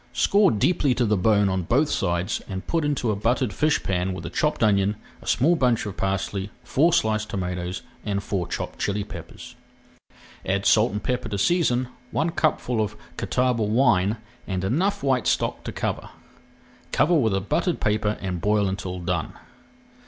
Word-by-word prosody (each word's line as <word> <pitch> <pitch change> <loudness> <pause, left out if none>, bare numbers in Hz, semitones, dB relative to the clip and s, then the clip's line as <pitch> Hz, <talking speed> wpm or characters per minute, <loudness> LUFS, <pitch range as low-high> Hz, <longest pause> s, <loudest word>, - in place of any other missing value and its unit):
Score 200 -1 +4
deeply 135 - +2
to 125 - +1
the 105 -1 +2
bone 105 +1 +3
on 95 -1 0
both 130 - +2
sides 90 -7 -1
and 95 -1 -5
put 165 -2 0
into 145 -6 0
a - - 0
buttered 115 +2 0
fish 155 +1 +1
pan 95 0 -1
with - - -7
a - - -5
chopped 150 -5 0
onion, 100 -1 +3 0.3
a - - -14
small 165 +7 +3
bunch 125 -8 +1
of 105 - -5
parsley, 95 +1 -2
four 155 +7 +3
sliced 110 -8 +1
tomatoes, 90 -1 -3 0.2
and 100 -2 -2
four 95 -5 -2
chopped - - -5
chilli 100 0 -1
peppers. - - -10 0.9
Add 100 +1 -1
salt 110 +2 +4
and 105 0 -4
pepper 125 -3 -2
to 100 - -2
season, 130 - +2 0.2
one 160 +6 0
cupful 125 -8 0
of 105 0 -3 0.2
Catawba 125 -2 0
wine, 110 -2 +3 0.3
and 95 -2 -2
enough 185 - 0
white 130 -3 +1
stock - - 0
to - - -3
cover. - - -3 0.8
Cover 155 +4 +3
with 115 - +3
a - - +1
buttered 170 - -1
paper 105 0 0
and 90 -3 -3
boil 105 0 +2
until 95 -1 -4
done. 85 - -2
105 Hz, 175 wpm, -24 LUFS, 95-130 Hz, 0.9 s, Score